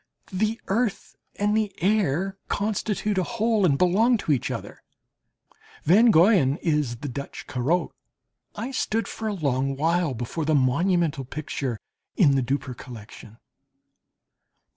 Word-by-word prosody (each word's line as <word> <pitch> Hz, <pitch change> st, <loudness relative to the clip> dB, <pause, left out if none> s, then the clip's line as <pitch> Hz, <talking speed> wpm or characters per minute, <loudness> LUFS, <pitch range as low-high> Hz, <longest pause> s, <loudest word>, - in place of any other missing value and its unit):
The 215 Hz, +4 st, 0 dB
earth 220 Hz, +1 st, -1 dB, 0.2 s
and 205 Hz, +1 st, +1 dB
the 215 Hz, -2 st, +1 dB
air 195 Hz, -1 st, +1 dB
constitute 210 Hz, -1 st, -1 dB
a -, -, +1 dB
whole 225 Hz, -2 st, +1 dB
and 140 Hz, -4 st, +2 dB
belong 215 Hz, -, +3 dB
to 180 Hz, -, -2 dB
each 135 Hz, -5 st, +1 dB
other. -, -, -6 dB, 1.0 s
Van 215 Hz, +9 st, +6 dB
Goyen 170 Hz, -7 st, +5 dB
is 150 Hz, -7 st, 0 dB
the 145 Hz, -, -4 dB
Dutch 140 Hz, +2 st, -7 dB
Corot. 145 Hz, +9 st, 0 dB, 0.6 s
I 235 Hz, +5 st, -4 dB
stood 225 Hz, -5 st, -1 dB
for 220 Hz, -, -5 dB
a 215 Hz, -, -1 dB
long 135 Hz, -4 st, 0 dB
while 165 Hz, -1 st, +1 dB
before 120 Hz, +8 st, -4 dB
the 155 Hz, 0 st, +2 dB
monumental 155 Hz, +2 st, +1 dB
picture 135 Hz, -3 st, -4 dB, 0.4 s
in 150 Hz, -8 st, +5 dB
the 135 Hz, -, +2 dB
Dupper 130 Hz, +1 st, -2 dB
collection. 115 Hz, -2 st, -11 dB
170 Hz, 135 wpm, -25 LUFS, 140-210 Hz, 1.0 s, Van